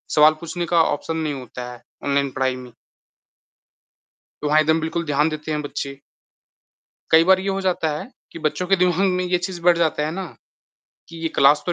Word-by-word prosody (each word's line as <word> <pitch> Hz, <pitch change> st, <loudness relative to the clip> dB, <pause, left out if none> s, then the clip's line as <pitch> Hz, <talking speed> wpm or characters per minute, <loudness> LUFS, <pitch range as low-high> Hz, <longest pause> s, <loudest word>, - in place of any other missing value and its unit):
सवाल 155 Hz, +1 st, +7 dB
पूछने 175 Hz, +1 st, -4 dB
का 165 Hz, -, +6 dB
ऑप्शन 160 Hz, +2 st, -2 dB
नहीं 155 Hz, -2 st, -2 dB
होता 125 Hz, -2 st, -7 dB
है 120 Hz, -, -12 dB, 0.2 s
ऑनलाइन 140 Hz, -1 st, +1 dB
पढ़ाई 130 Hz, 0 st, 0 dB
में। 125 Hz, -1 st, -10 dB, 1.7 s
तो 150 Hz, -, -1 dB
वहाँ 150 Hz, +1 st, +4 dB
एकदम 160 Hz, +1 st, +3 dB
बिल्कुल 165 Hz, +1 st, -2 dB
ध्यान 150 Hz, +1 st, +2 dB
देते 155 Hz, 0 st, -5 dB
हैं 150 Hz, -, -1 dB
बच्चे। 140 Hz, -1 st, -6 dB, 1.1 s
कई 160 Hz, +1 st, +7 dB
बार 190 Hz, +1 st, +5 dB
ये 195 Hz, +1 st, -2 dB
हो 195 Hz, 0 st, -1 dB
जाता 180 Hz, -4 st, 0 dB
है 155 Hz, -, -7 dB, 0.2 s
कि 165 Hz, -, -9 dB
बच्चों 155 Hz, +4 st, -1 dB
के 195 Hz, -, +4 dB
दिमाग 180 Hz, -2 st, +2 dB, 0.2 s
में 180 Hz, -, 0 dB
ये 180 Hz, 0 st, +1 dB
चीज़ 180 Hz, -1 st, -5 dB
बैठ 175 Hz, 0 st, +4 dB
जाती 160 Hz, -3 st, +1 dB
है 155 Hz, -, -2 dB
ना 190 Hz, +3 st, -4 dB, 0.9 s
कि 165 Hz, -, -11 dB
ये 165 Hz, -, 0 dB
क्लास 145 Hz, +2 st, +5 dB
तो 175 Hz, -, +1 dB
160 Hz, 200 wpm, -22 LUFS, 145-175 Hz, 1.7 s, सवाल